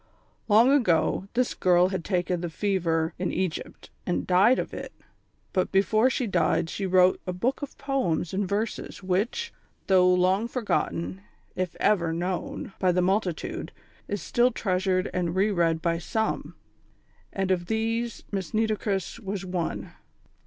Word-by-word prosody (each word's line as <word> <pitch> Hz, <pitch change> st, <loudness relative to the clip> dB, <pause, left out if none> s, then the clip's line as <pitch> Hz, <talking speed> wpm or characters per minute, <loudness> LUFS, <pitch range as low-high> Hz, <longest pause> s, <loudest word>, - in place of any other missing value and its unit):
Long 230 Hz, +4 st, +6 dB
ago, 190 Hz, -, +2 dB
this 250 Hz, 0 st, +1 dB
girl 180 Hz, 0 st, +3 dB
had 190 Hz, -3 st, -3 dB
taken 180 Hz, -2 st, -1 dB
the 175 Hz, -, -3 dB
fever 165 Hz, -3 st, 0 dB
in 180 Hz, -, -1 dB
Egypt, 185 Hz, -3 st, -4 dB
and 180 Hz, -, -1 dB
died 195 Hz, +8 st, +5 dB
of -, -, -3 dB
it; -, -, -6 dB, 0.6 s
but 185 Hz, -, +1 dB
before 215 Hz, +5 st, +3 dB
she 255 Hz, -, -1 dB
died 170 Hz, -4 st, +1 dB
she 195 Hz, -, -2 dB
wrote 185 Hz, 0 st, +4 dB
a -, -, 0 dB
book 240 Hz, +9 st, -1 dB
of 285 Hz, -, -7 dB
poems 185 Hz, -, -1 dB
and 195 Hz, -1 st, -1 dB
verses, 210 Hz, -1 st, -3 dB
which, 210 Hz, -, -1 dB, 0.3 s
though 180 Hz, -1 st, +5 dB
long 185 Hz, +4 st, +2 dB
forgotten 205 Hz, -6 st, -2 dB, 0.3 s
if 185 Hz, -2 st, -2 dB
ever 175 Hz, -6 st, +2 dB
known 175 Hz, +3 st, -3 dB
by 185 Hz, -1 st, +3 dB
the 180 Hz, 0 st, +2 dB
multitude, 190 Hz, -2 st, -1 dB, 0.4 s
is 205 Hz, -1 st, -3 dB
still 240 Hz, +1 st, +3 dB
treasured 185 Hz, -4 st, 0 dB
and 175 Hz, -1 st, -1 dB
re 200 Hz, +3 st, +2 dB
read 165 Hz, -3 st, +1 dB
by 165 Hz, -1 st, +1 dB
some, 220 Hz, +5 st, -2 dB, 0.8 s
and 190 Hz, -1 st, -1 dB
of 175 Hz, -2 st, 0 dB
these 225 Hz, +2 st, -1 dB
Miss 195 Hz, -1 st, -3 dB
Nitocris 215 Hz, -2 st, -1 dB
was 195 Hz, -3 st, -4 dB
one. 180 Hz, -2 st, -3 dB
190 Hz, 150 wpm, -26 LUFS, 180-215 Hz, 0.8 s, Long